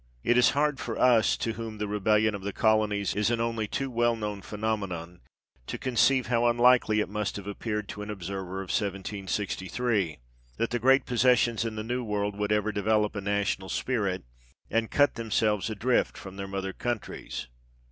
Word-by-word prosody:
It 120 - +3
is 125 - +6
hard 150 -1 +2
for 115 - -4
us, 120 -4 +4
to 115 - -2
whom 110 -1 -6
the 105 0 -2
rebellion 105 +1 +2
of 100 - -5
colonies 105 -2 +2
is 105 +2 +1
an 120 -1 0
only 115 -2 -1
too 135 +5 -3
well 120 0 +2
known 105 -2 -4
phenomenon, 95 -6 -4 0.5
to - - -4
conceive 130 0 +2
how 120 0 +2
unlikely 120 -2 +4
it - - -2
must 105 0 -3
have 100 - -6
appeared, 105 0 -3
to 105 - -6
an 105 - -6
observer 95 -1 -5
of 95 - -9
1763, 100 -1 -2 0.4
that 115 +1 -1
the 120 - 0
great 135 +3 +4
posses 125 0 +4
sions 115 -3 +1
in 110 -1 -3
the 110 - -4
New 125 +2 -2
World 105 -2 -1
would 105 0 -2
ever 105 0 +2
develop 105 +1 +1
a 105 - -3
national 100 -1 -1
spirit, 100 -8 -1 0.5
and 115 0 +1
cut 145 0 +3
themselves 110 -2 0
adrift 110 +4 +1
from 95 -1 -9
their 100 0 -5
mother 95 0 -4
countries. 120 - -4
105 Hz, 180 wpm, -28 LUFS, 100-120 Hz, 0.5 s, is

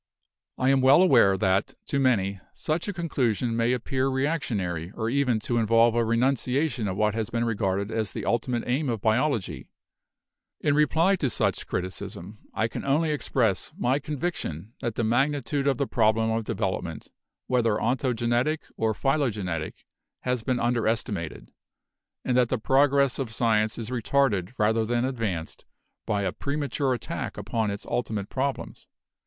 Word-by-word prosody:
"I 130 - +2
am 135 -1 +3
well 135 +7 +7
aware 115 - +5
that 100 +7 +1
to 140 - -1
many 100 -7 +2 0.2
such 160 +4 -2
a - - -1
conclusion 125 - 0
may 115 +1 +2
appear 130 +2 0
reactionary 115 - -1
or 110 +1 -2
even 130 -4 +2
to 120 +2 0
involve 115 +1 +4
a 120 0 +2
renunciation 125 +2 +1
of 95 -1 -3
what 105 0 +2
has 110 0 -2
been 120 0 -1
regarded 100 -2 -1
as 110 -3 -1
the - - -5
ultimate 120 0 0
aim 135 +3 0
of 115 -2 -1
biology. 110 - 0 0.9
In 145 - +1
reply 160 +6 +3
to 140 -6 0
such - - 0
a - - -10
criticism, 95 +2 -5
I 110 - 0
can - - -6
only 155 +3 +2
express 120 -9 0
my 130 +3 +1
con 150 +1 -5
viction 110 - -4
that 120 -4 -3
the 120 - -1
magnitude 140 +4 +1
of 135 -3 +2
the 140 - 0
problem 110 -2 +2
of 110 0 -1
development, - - -3 0.3
whether 120 -4 +2
ontogenetic 120 +4 0 0.2
or 110 -1 0
phylogenetic, 105 - -1 0.4
has 125 -2 -1
been 125 +1 -1
under 120 -1 +1
estimated; 95 - -3 0.7
and 125 - +1
that 125 -2 +3
the 130 - 0
progress 140 +2 +3
of 130 -4 -2
science 110 -1 +1
is 115 0 -5
retarded 120 -5 +1
rather 110 +1 +2
than 120 +2 0
advanced 110 -11 -3 0.4
by 100 -1 0
a 95 - 0
premature 140 -1 -1
attack - - -5
upon 110 -2 -1
its 100 0 -5
ulti 125 - -2
mate 100 -1 -4
problems. 135 +1 -3
120 Hz, 160 wpm, -26 LUFS, 110-135 Hz, 0.9 s, well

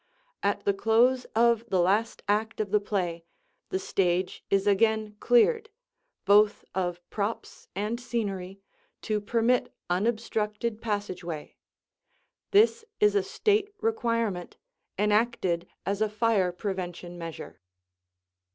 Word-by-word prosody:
At 200 - 0
the 200 - +3
close 235 +5 +3
of 235 0 +4
the 185 - +2
last 200 +6 +1
act 215 +2 0
of 210 -3 -2
the 210 - +4
play 180 -5 -2 0.5
the - - 0
stage 185 -1 0
is 195 0 +2
again 215 +1 +2
cleared, 440 - +3 0.6
both 205 +1 +4
of 175 -2 -3
props 210 +2 -4
and 210 +4 -2
scenery, 200 -6 -4 0.4
to 215 -1 -1
permit 235 +4 +1 0.2
unobstructed 215 +2 -1
passageway. 185 -7 -4 0.9
This 445 +3 +4 0.2
is 420 0 +4
a 405 - +3
state 415 +1 +1
requirement, 230 - -1 0.4
enacted 210 -4 +1 0.2
as 200 +2 -1
a 215 - +2
fire 210 -4 +2
prevention 175 -2 -5
measure. 165 -1 -8
210 Hz, 115 wpm, -28 LUFS, 190-230 Hz, 0.9 s, of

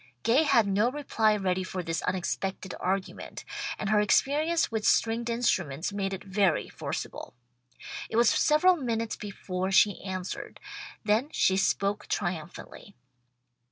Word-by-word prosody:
Gay 235 +6 +4
had 275 -8 +4
no 200 +4 +2
reply 230 -6 +1
ready 185 -2 0
for 185 -1 -5
this 165 -1 -2
unexpected 190 0 -3
argument, 190 +1 -3 0.3
and 210 0 -2
her 210 - +4
experience 300 +9 +2
with 220 -1 -2
stringed 230 +2 +2
instruments 190 - 0
made 195 -1 -2
it 195 0 -5
very 195 -3 +1
forcible. - - -6 0.7
It - - -5
was 235 0 +5
several 335 +5 +4
minutes 230 -7 -2
before 190 -2 -4
she 200 +1 +4
answered, 185 -1 -5 0.5
then 220 +7 +2
she 190 - +2
spoke 200 +1 0
triumphantly. 175 +3 -5
205 Hz, 130 wpm, -28 LUFS, 190-230 Hz, 0.7 s, was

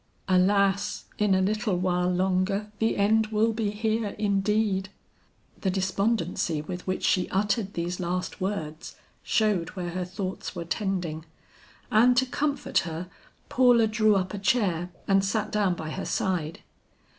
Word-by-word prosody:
Alas 200 +2 +2
in 210 -2 +3
a 190 - +2
little 210 -1 0
while 180 0 +1
longer 190 +3 0
the 225 0 +1
end 215 +2 +3
will 220 +1 +1
be 220 -2 -1
here 215 0 -1
indeed!" 200 -1 +1 0.7
The 190 - 0
despondency 190 -3 0
with 180 +3 -7
which 185 - -2
she 185 -2 +2
uttered 200 +1 0
these 175 +1 -3
last 180 +2 -3
words 170 -5 -4 0.3
showed 210 -7 +1
where 175 -2 -4
her 180 +1 -2
thoughts 190 +1 -5
were 170 -1 -4
tending, 175 -4 -2 0.7
and 245 +3 +5
to 260 - +4
comfort 275 0 0
her, 170 +2 -5 0.4
Paula 245 -2 +5
drew 215 -1 +3
up 185 0 -1
a 205 - -4
chair 190 -5 +1 0.2
and 195 -1 +4
sat 205 +2 -1
down 200 -4 +1
by 155 -2 -6
her 195 - -4
side. 170 -4 -2
195 Hz, 145 wpm, -27 LUFS, 180-215 Hz, 0.7 s, and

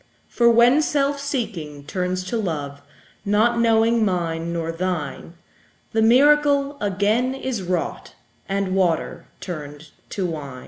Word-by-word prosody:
For 235 -1 +3
when 240 +5 +5
self 285 -2 0
seeking 190 - -4
turns 185 +3 -2
to 210 +6 -3
love, 145 -8 -4 0.4
Not 220 +3 +2
knowing 230 0 +3
mine 170 -4 -1
nor 165 -1 -2
thine, 165 -2 -4 0.6
The 220 - +1
miracle 285 +4 +4
again 210 +6 +1
is 260 -5 -3
wrought, 180 -2 -3 0.3
And 195 -1 -1
water 180 -4 0
turned 150 -3 -7 0.2
to 195 - -3
wine. 145 -6 -5
195 Hz, 125 wpm, -22 LUFS, 165-235 Hz, 0.6 s, when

